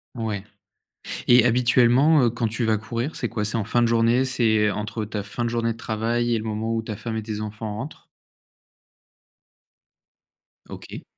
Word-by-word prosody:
Ouais. 110 -4 -3 0.8
Et 120 -1 +6
habituellement, 125 +5 +4
heu, 120 - +4
quand 115 -1 -1
tu 115 +3 -3
vas 110 -1 +2
courir, 115 +7 -4
c'est 120 - -2
quoi? 110 -2 -3
C'est 110 +2 -1
en 110 - 0
fin 120 +3 +1
de 115 - +3
journée, 115 +2 +3
c'est, 110 -5 +2
heu, - - -1
entre 105 +1 -4
ta 105 -1 -4
fin 120 +4 -4
de 115 - 0
journée 115 -1 0
de - - -16
travail 120 +2 -1
et 115 - +2
le 110 - -4
moment 110 +1 -2
où 115 - 0
ta 110 -1 -6
femme 115 +2 -5
et 110 - -3
tes 105 -1 -4
enfants 110 0 -5
rentrent? 135 +8 -8 2.6
OK. - - -9
115 Hz, 190 wpm, -24 LUFS, 110-120 Hz, 2.6 s, Et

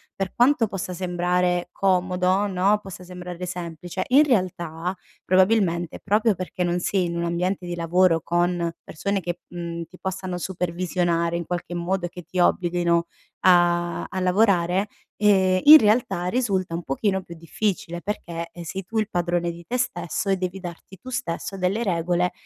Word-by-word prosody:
per 195 -1 -3
quanto 245 -2 +4
possa 195 -1 -4
sembrare 180 0 0
comodo, 185 +1 +1
no, 200 +2 +2
possa 190 -2 -10
sembrare 180 0 -8
semplice, 175 -1 -5
in 275 +4 +7
realtà 180 - -1 0.3
probabilmente 185 -3 +2
proprio 210 +1 +2
perché 185 +1 -4
non 175 0 0
sei 185 0 0
in 170 0 -3
un 170 - -1
ambiente 180 +2 -1
di 175 - -4
lavoro 170 0 +3
con 175 0 0
persone 200 +5 -2
che, 175 0 -4
mhmm, 170 -1 -5
ti 185 - -16
possano 185 -1 -4
supervisionare 175 -1 -1
in 170 - -4
qualche 175 0 -4
modo, 175 +1 -1
che 175 0 -10
ti 175 +3 -8
obblighino 175 -1 +2 0.3
a 175 -1 +3
a 190 - -4
lavorare, 185 0 +2 0.3
ehm, 190 -3 +4
in 305 +2 +12
realtà 210 -5 +1
risulta 190 -7 0
un 170 - -4
pochino 190 +7 -1
più 170 - -10
difficile 175 +1 -3
perché, 170 -5 -4
eh, 175 - -9
sei 190 +3 -5
tu 220 +3 -2
il 215 -1 -1
padrone 175 0 0
di 170 0 -12
te 250 - -2
stesso 175 -4 -2
e 195 - +3
devi 185 +1 -3
darti 180 +1 -9
tu 255 - -9
stesso 195 -3 -4
delle 190 +5 0
regole 175 -2 +1
180 Hz, 165 wpm, -24 LUFS, 175-195 Hz, 0.3 s, in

